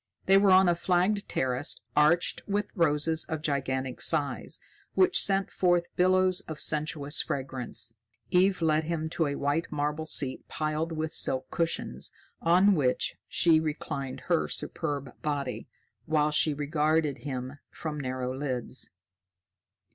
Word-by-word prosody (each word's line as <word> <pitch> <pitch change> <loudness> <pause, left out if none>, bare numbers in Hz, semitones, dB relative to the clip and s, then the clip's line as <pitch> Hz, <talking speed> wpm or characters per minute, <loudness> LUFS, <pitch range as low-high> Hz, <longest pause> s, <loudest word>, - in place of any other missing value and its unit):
They 195 +1 +6
were 200 0 +4
on 190 0 +6
a 175 - +4
flagged 185 +4 +1
terrace 130 +2 +1 0.2
arched 155 +4 +3
with 205 0 -1
roses 160 -2 +2
of 155 -1 -4
gigantic 130 -3 -2
size, 150 -4 -1 0.4
which 370 -1 +4
sent 195 -1 +1
forth 175 -2 +1
billows 185 0 +3
of 155 - -6
sensuous 150 0 -1
fragrance. 130 -4 -4 0.4
Eve 185 -1 +3
led 155 0 +2
him 160 -1 -3
to 165 -2 +1
a 140 - -2
white 145 +4 -1
marble 150 +1 -2
seat 135 -4 0
piled 155 +2 -2
with 160 0 -3
silk 130 0 0
cushions, 160 - -2 0.3
on 185 +5 +5
which 135 -7 0
she 165 -2 +4
reclined 140 -4 -4
her 170 +4 +1
superb 145 -5 -4
body, 140 -4 -3 0.4
while 150 -1 +2
she 150 +1 +3
regarded 150 0 0
him 130 0 -5
from 150 -2 -5
narrowed 130 -1 -3
lids. 130 -2 -2
155 Hz, 135 wpm, -28 LUFS, 140-170 Hz, 0.4 s, They